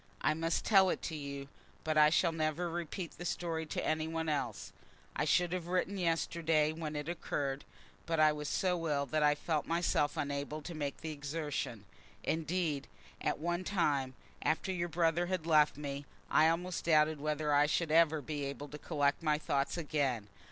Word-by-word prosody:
I - - +3
must 165 +1 -1
tell 195 -3 +6
it - - -2
to 160 - -3
you, 140 -2 -6 0.4
but 155 0 0
I 150 0 +7
shall 170 +1 +3
never 160 +2 -1
repeat 170 +1 -5
the - - -5
story 165 -2 -2
to - - -3
any 155 0 0
one 160 0 -2
else. 130 -8 -2 0.4
I - - 0
should 175 -1 +2
have 180 -2 -3
written 185 +2 0
yesterday, 165 -2 +1
when 155 -2 -5
it 150 0 -3
occurred, 145 -5 -3 0.4
but 165 -1 0
I 155 0 +6
was 150 -1 -4
so 180 -3 0
ill 140 -1 +1
that 155 +3 0
I 150 0 +5
felt 155 0 -1
myself 165 -3 +1
unable 145 +1 -3
to 170 - -6
make 145 -3 -4
the 160 - -4
exertion. 145 -7 -4 0.4
Indeed, 160 -3 -1 0.3
at - - 0
one 175 +3 -1
time, 145 -9 0 0.3
after 160 +4 0
your 175 -2 -2
brother 170 +1 +1
had 180 -3 -2
left 155 -3 +4
me, 140 -1 -5 0.2
I 155 +1 +6
almost 175 +2 -2
doubted 155 -2 +4
whether 150 0 0
I 145 +1 +5
should 160 +1 0
ever 160 -2 +4
be 145 0 -3
able 140 +1 -6
to 150 - -8
collect 145 -2 0
my 155 -2 +2
thoughts 140 0 -1
again. 140 -9 -1
155 Hz, 185 wpm, -33 LUFS, 145-170 Hz, 0.4 s, I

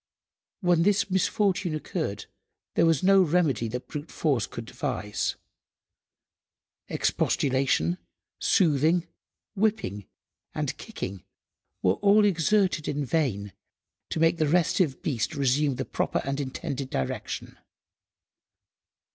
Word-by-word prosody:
When 175 -3 +3
this 200 +1 +2
misfortune 190 -2 +1
occurred 150 - -3 0.5
there 165 - +4
was 165 -2 +2
no 195 +1 +6
remedy 155 -9 +2
that 125 +3 -5
brute–force 145 -6 -1
could 115 - -7
devise. 105 -2 -2 1.5
Expostulation, 135 +6 +1 0.4
soothing, 160 0 +3 0.5
whipping, 205 - -1 0.5
and - - -2
kicking, 95 -1 -6 0.6
were 95 +2 +2
all 205 +1 +5
exerted 185 -2 +2
in 145 0 -1
vain 115 -9 -1 0.6
to - - -2
make 165 +1 +3
the 155 -2 +2
restive 170 -2 +2
beast 135 +1 -1
resume 140 +1 +2
the - - -3
proper - - -1
and 135 +1 -2
intended 140 0 -4
direction. 65 -1 -4
155 Hz, 105 wpm, -27 LUFS, 130-180 Hz, 1.5 s, no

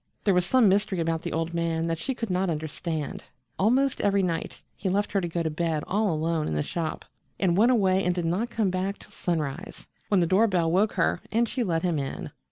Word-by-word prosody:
There 200 - +3
was 180 0 +2
some 255 -4 +5
mystery 195 -1 +2
about 165 -1 0
the - - -4
old 165 +1 -2
man 165 -1 0
that 165 -1 -2
she 265 +6 -3
could 230 -5 -4
not 180 +1 +1
understand. 155 0 -3 0.4
Almost 255 +7 +2
every 200 -1 +2
night 165 -3 -2 0.2
he 195 - -2
left 205 +2 0
her 200 - +1
to 175 - -2
go 170 0 -2
to 160 - 0
bed 160 -1 -1
all 205 0 +1
alone 160 0 0
in 75 - -2
the 75 - 0
shop, 165 -2 -4 0.3
and 180 -3 +2
went 230 +6 +5
away 195 -5 +3
and 180 0 +1
did 175 -2 -1
not 190 +8 0
come 220 -5 0
back 190 +2 -2
till - - -17
sunrise, 160 0 -3 0.2
when 200 - +3
the 175 - +3
door 190 +7 +4
bell 175 -5 +1
woke 200 +5 +2
her - - +1
and 235 +1 +2
she 250 - -1
let 165 -5 0
him 170 -4 +1
in. 135 - -5
180 Hz, 235 wpm, -26 LUFS, 165-200 Hz, 0.4 s, some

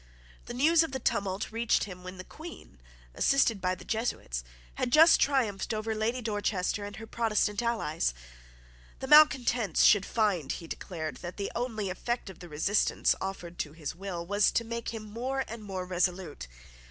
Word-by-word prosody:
The 240 - -6
news 315 +6 +5
of 325 -5 -1
the 265 - -2
tumult 200 -4 -1
reached 230 +1 +1
him 180 -2 -8
when 185 +1 -8
the 185 - -7
Queen, 315 - -12 0.3
assisted 230 - +2
by 185 0 0
the 185 - -13
Jesuits, 220 - -2 0.3
had 245 - -2
just 320 +4 +7
triumphed 230 -7 +1
over 220 +1 -2
Lady 230 +3 -1
Dorchester 205 -2 -1
and 205 0 -7
her 225 - -8
Protestant 215 -2 0
allies. 165 - -1 0.8
The - - -6
malecontents 260 -6 +5
should 205 -2 +6
find, 200 - +1
he 170 - -7
declared, 160 -2 -5
that 175 0 -8
the 200 - -3
only 220 -5 -2
effect 235 +2 -3
of 180 - -16
the 175 - -10
resistance 160 +8 +2
offered 180 -3 -6
to 150 - -3
his 155 -3 -5
will 175 -1 -5
was 205 +3 +3
to 230 - +2
make 235 0 -4
him 225 -2 -6
more 250 +6 -3
and 225 -1 -8
more 190 -3 -4
resolute. 180 - -2
210 Hz, 175 wpm, -29 LUFS, 180-235 Hz, 0.8 s, just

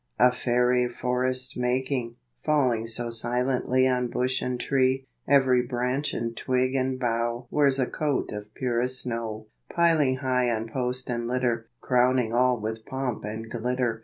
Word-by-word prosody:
A 125 - +6
fairy 125 0 +1
forest 130 +1 -1
making, 125 -1 -1 0.3
Falling 125 -7 +1
so 115 +1 0
silently 125 +2 +2
On 125 -1 +1
bush 125 +2 -1
and 125 -1 -2
tree, 130 0 +1 0.2
Every 130 -3 +4
branch 125 +3 -2
and 115 0 -3
twig 130 +1 0
and 130 -1 0
bough 120 0 -1
Wears 140 -3 +3
a 130 - +2
coat 150 +2 -2
of 105 0 -7
purest 125 +1 0
snow, 115 -3 -4 0.2
Piling 160 -6 +3
high 130 -2 0
on 115 -1 -1
post 125 +1 -2
and 120 -1 -2
litter, 120 -2 -1
Crowning 125 -2 +2
all 125 0 +3
with 110 +1 -4
pomp 130 -2 -4
and 110 +2 -5
glittor. 120 0 -1
125 Hz, 150 wpm, -26 LUFS, 120-130 Hz, 0.3 s, A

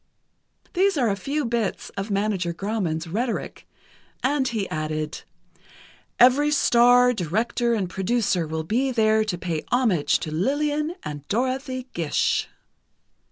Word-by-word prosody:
_" - - -40
These 385 -1 +2
are 240 -6 +2
a - - 0
few 280 +8 -2
bits 230 -3 -2
of 195 +2 -5
Manager 195 -4 -1
Grauman's 185 -5 -2
rhetoric, 225 +8 -3 0.6
and 270 0 +1
he 220 -5 -2
added: 155 0 -3 1.0
"Every 260 +4 +6
star, 245 -3 +5
director 230 +6 0
and 200 -4 -1
producer, 190 -2 0
will 160 +1 -3
be 245 +11 0
there 220 -2 +3
to 205 -5 -3
pay 170 -3 -3
homage 210 - +2
to 155 - -4
Lillian 295 - 0
and 145 -1 -7
Dorothy 255 +2 -2
Gish." 165 -3 0
220 Hz, 130 wpm, -24 LUFS, 175-255 Hz, 1.0 s, Every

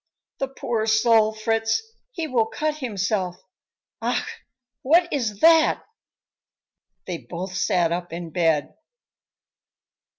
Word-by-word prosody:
"The 270 - -1
poor 235 -4 -2
soul, 220 0 +4
Fritz, 225 - 0 0.3
he 335 -9 -4
will 240 -7 +1
cut 305 +5 -2
himself. 200 -7 -2 0.7
Ach! - - -2 0.4
what 340 +6 +4
is 220 -8 -2
that?" 325 -1 +5 1.2
They 175 -3 -4
both 180 +2 -7
sat 180 -4 +1
up 175 +1 -3
in 170 0 -6
bed. 160 -4 +1
220 Hz, 105 wpm, -23 LUFS, 180-255 Hz, 1.2 s, that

